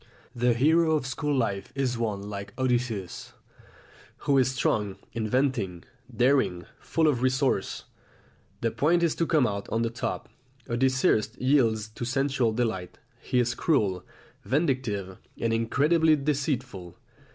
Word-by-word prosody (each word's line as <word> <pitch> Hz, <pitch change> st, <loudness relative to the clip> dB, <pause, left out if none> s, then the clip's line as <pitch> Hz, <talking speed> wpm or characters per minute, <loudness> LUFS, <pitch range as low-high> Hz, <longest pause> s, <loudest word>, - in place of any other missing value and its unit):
The 120 Hz, 0 st, +2 dB
hero 160 Hz, +5 st, +4 dB
of 150 Hz, -, -1 dB
school 145 Hz, +2 st, -1 dB
life 100 Hz, -6 st, -1 dB
is 130 Hz, -3 st, 0 dB
one 110 Hz, -4 st, -2 dB
like 100 Hz, 0 st, -7 dB
Odysseus, 120 Hz, -7 st, -2 dB, 0.9 s
who 140 Hz, -1 st, +4 dB
is 130 Hz, -1 st, +3 dB
strong, 105 Hz, -6 st, 0 dB, 0.2 s
inventive, 110 Hz, -6 st, -1 dB, 0.3 s
daring, 120 Hz, -7 st, +2 dB
full 160 Hz, -1 st, +1 dB
of 130 Hz, -5 st, +1 dB
resource. 130 Hz, +1 st, 0 dB, 0.8 s
The 115 Hz, -, +1 dB
point 170 Hz, +7 st, +2 dB
is 165 Hz, -, +2 dB
to 165 Hz, -, +1 dB
come 155 Hz, -6 st, +3 dB
out 100 Hz, -2 st, -3 dB
on 115 Hz, +1 st, 0 dB
the 115 Hz, -, -1 dB
top. 120 Hz, 0 st, -4 dB, 0.4 s
Odysseus 120 Hz, -2 st, +1 dB
yields 120 Hz, -6 st, +2 dB
to 110 Hz, -, -7 dB
sensual 130 Hz, -1 st, +1 dB
delight, 110 Hz, -6 st, -2 dB, 0.2 s
he -, -, -2 dB
is 125 Hz, 0 st, +2 dB
cruel, 100 Hz, -, +1 dB, 0.4 s
vindictive, 120 Hz, -, -1 dB, 0.2 s
and 115 Hz, -1 st, 0 dB
incredibly 150 Hz, +8 st, +3 dB
deceitful. 130 Hz, -, -2 dB
125 Hz, 130 wpm, -27 LUFS, 110-140 Hz, 0.9 s, hero